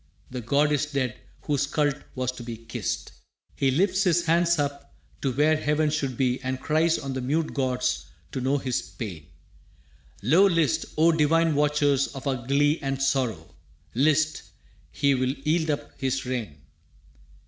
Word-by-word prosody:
The 125 -1 -4
god 140 +6 +2
is 150 0 +1
dead 135 -4 -1 0.3
whose 145 -1 0
cult 145 0 +1 0.2
was 130 -1 -1
to 125 - -10
be 115 -1 -6
kissed! 115 0 -4 0.4
He 135 - +2
lifts 185 +7 +2
his 175 -3 +2
hand 170 +1 +3
up 140 -1 -3 0.3
to 135 - 0
where 150 +5 +3
heaven 150 0 +1
should 140 -5 -2
be 130 -1 +1
And 130 0 -3
cries 160 +3 +2
on 135 -1 -5
the 130 - -3
mute 155 +5 -1
gods 125 -2 -1 0.2
to 130 - -3
know 135 +3 +1
his 130 -3 -1
pain. 90 - -8 1.0
Lo, 165 - +5
list!, 165 - +1
o 165 +2 +5
divine 165 +1 +3
watchers 145 -2 +2
of 135 +1 -7
our 130 -3 -2
glee 145 +3 +3
And 135 -2 -2
sorrow!, 135 -4 -1 0.4
list!, 155 +4 +2 0.5
he 140 -1 +2
will 130 0 0
yield 155 +3 0
up 145 - -2
his 135 0 -1
reign. 110 - -4
140 Hz, 160 wpm, -26 LUFS, 130-155 Hz, 1.0 s, Lo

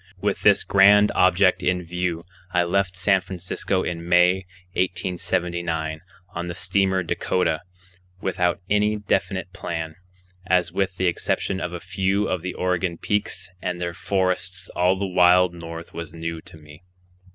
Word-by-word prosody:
With 100 +1 -1
this 100 -1 +5
grand 100 +1 +6
object 90 +1 +4
in 90 0 0
view 90 -1 -3 0.3
I 90 -1 +3
left 90 +1 0
San 95 +1 +3
Francisco 95 +1 -2
in 85 0 -4
May, 90 +1 +4 0.3
1879, 85 -3 -1 0.3
on 85 +1 -4
the 85 - -5
steamer 95 +1 +1
Dakota, 85 -1 0 0.6
without 90 -1 0
any 105 +1 +2
definite 105 -1 -1
plan, 80 -1 -4 0.5
as 90 -2 +2
with 95 0 -1
the 95 - 0
exception 90 +1 -1
of 90 0 -3
a 90 - -4
few 95 +3 0
of 90 - -1
the 90 +1 -5
Oregon 90 -1 -1
peaks 105 -1 -2
and 90 - -3
their 85 -1 -3
forests 95 0 -1
all 90 +2 +2
the 100 - -2
wild 90 -1 +4
north 85 0 -8
was 85 -1 -7
new 85 0 -4
to - - -12
me. 75 +1 -15
90 Hz, 150 wpm, -23 LUFS, 85-95 Hz, 0.6 s, grand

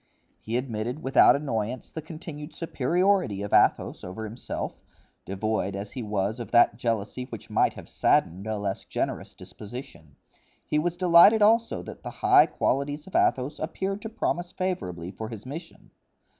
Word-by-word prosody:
He 115 +2 -2
admitted 125 +3 -3
without 135 - +6
annoyance 125 -4 -3
the 160 - -5
continued 155 -1 -9
superiority 170 - +1
of 100 - -5
Athos - - +3
over 95 +5 -6
himself, 110 +3 -5 0.4
devoid 100 0 -2
as 100 +1 -5
he 130 - -5
was 105 +1 -2
of 120 - -6
that 120 -2 +5
jealousy 115 +1 -2
which - - -10
might - - +3
have - - -11
saddened 95 +5 +1
a 110 -1 -1
less 100 -1 -3
generous - - -3
disposition; 100 - -10 0.5
he 150 - +1
was 175 +2 -1
delighted 180 +4 +7
also 230 +2 +3
that - - -10
the - - -6 0.2
high - - +7
qualities 145 +3 -1
of 190 - -11
Athos 135 +4 +1
appeared 195 +5 -3
to 220 - -6
promise 175 -5 -2
favorably 90 - -3
for 110 +3 -7
his 110 -1 -8
mission. 165 +6 -9
125 Hz, 155 wpm, -26 LUFS, 105-165 Hz, 0.5 s, delighted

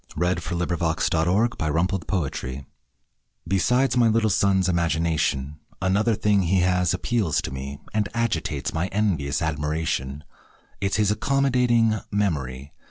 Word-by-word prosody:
HIS 90 +1 0
MEMORY 85 +3 +1 2.0
Besides 125 +10 +2
my 120 -1 +5
little 110 0 +2
son's 95 -1 +2
imagination, 80 -4 0 0.2
Another 100 +4 +2
thing 105 -1 +2
he 95 +1 +2
has 90 -2 +2
appeals 95 - 0
to - - -5
me 70 +1 -6
And 105 -1 0
agitates 80 -11 -1
my 80 +3 -1
envious 90 -8 -1
admiration 75 -2 -2 0.6
It's 100 0 0
his 105 -1 +2
accommodating 120 -2 +2
memory. 70 -10 -2
90 Hz, 105 wpm, -24 LUFS, 80-105 Hz, 2.0 s, my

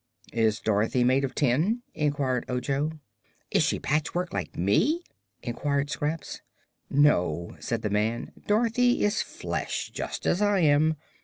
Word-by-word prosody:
"Is 110 -2 +2
Dorothy 110 +4 +1
made 130 +3 +3
of 135 -1 -3
tin?" 160 - +1
inquired 140 -4 0
Ojo. 135 +5 -1 0.6
"Is - - +3
she - - +1
patchwork, 155 +4 -1
like - - -4
me?" 105 - +2 0.4
inquired 140 +4 -1
Scraps. 155 +1 -3 0.5
"No," 90 - +2
said 115 -1 -3
the 105 - -1
man; 110 +3 0 0.2
"Dorothy 235 +3 +3
is 205 +1 +1
flesh, - - -4
just - - -5
as 180 - +2
I 205 -2 +3
am. 155 +1 +4
145 Hz, 135 wpm, -27 LUFS, 120-165 Hz, 0.6 s, am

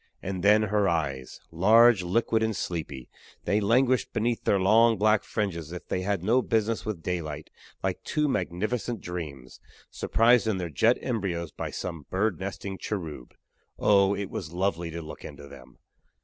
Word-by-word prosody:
And 95 -1 -3
then 105 +1 +5
her 105 -2 +1
eyes 70 -6 -3
large, 110 +5 +5
liquid 110 +5 +1
and 110 -1 0
sleepy 80 -8 -5 0.4
they 105 +1 +1
languished 125 +4 +2
beneath 115 +1 -1
their 100 - +3
long 110 +4 +5
black 105 +1 +3
fringes 90 -8 -3
as 85 - -10
if 90 - -8
they 90 - -1
had 95 -2 -1
no 120 +6 +3
business 115 -2 0
with 95 -7 -4
daylight 80 -5 -4 0.3
like - - -2
two 150 0 0
magnificent 110 +2 -2
dreams, 75 -9 -7 0.3
surprised 115 0 +3
in 110 -3 +1
their 90 -3 -4
jet 110 - +3
embryos 90 - -2
by - - -5
some 80 -4 -6
bird 95 -2 0
nesting 95 0 -5
cherub. 80 - -6 0.4
Oh! 100 -1 +4
it 100 -1 -5
was 80 -4 -5
lovely 85 -1 -1
to 85 0 -6
look 75 - -10
into 70 - -10
them! 65 -3 -14
95 Hz, 165 wpm, -27 LUFS, 85-110 Hz, 0.4 s, then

